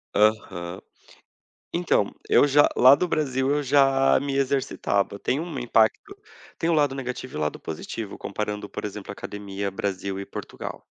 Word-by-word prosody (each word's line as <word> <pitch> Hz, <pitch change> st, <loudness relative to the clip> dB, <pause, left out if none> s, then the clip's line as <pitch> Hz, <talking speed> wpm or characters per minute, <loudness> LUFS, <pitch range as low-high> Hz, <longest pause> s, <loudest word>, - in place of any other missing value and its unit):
Aham. 100 Hz, -5 st, +1 dB, 0.9 s
Então, 170 Hz, -, +1 dB, 0.2 s
eu -, -, +5 dB
já 145 Hz, +1 st, +5 dB
lá 130 Hz, +3 st, +8 dB
do 180 Hz, +5 st, -1 dB
Brasil, 135 Hz, -4 st, 0 dB
eu 145 Hz, 0 st, +1 dB
já 135 Hz, -1 st, +4 dB
me 140 Hz, -1 st, -3 dB
exercitava, 130 Hz, -7 st, 0 dB
tem 135 Hz, -, 0 dB
um 160 Hz, -4 st, -4 dB
impacto 120 Hz, -, +1 dB, 0.4 s
tem 165 Hz, -, -1 dB
o -, -, +3 dB
lado 145 Hz, -3 st, +2 dB
negativo 130 Hz, -1 st, -5 dB
e -, -, -3 dB
o -, -, -3 dB
lado 75 Hz, 0 st, -2 dB
positivo, 100 Hz, +6 st, -6 dB
comparando, 105 Hz, 0 st, -4 dB
por -, -, -7 dB
exemplo, 105 Hz, -1 st, -6 dB
a -, -, -6 dB
academia 100 Hz, -1 st, -5 dB
Brasil 95 Hz, 0 st, -3 dB
e 100 Hz, -, -5 dB
Portugal. -, -, -7 dB
125 Hz, 165 wpm, -25 LUFS, 100-140 Hz, 0.9 s, lá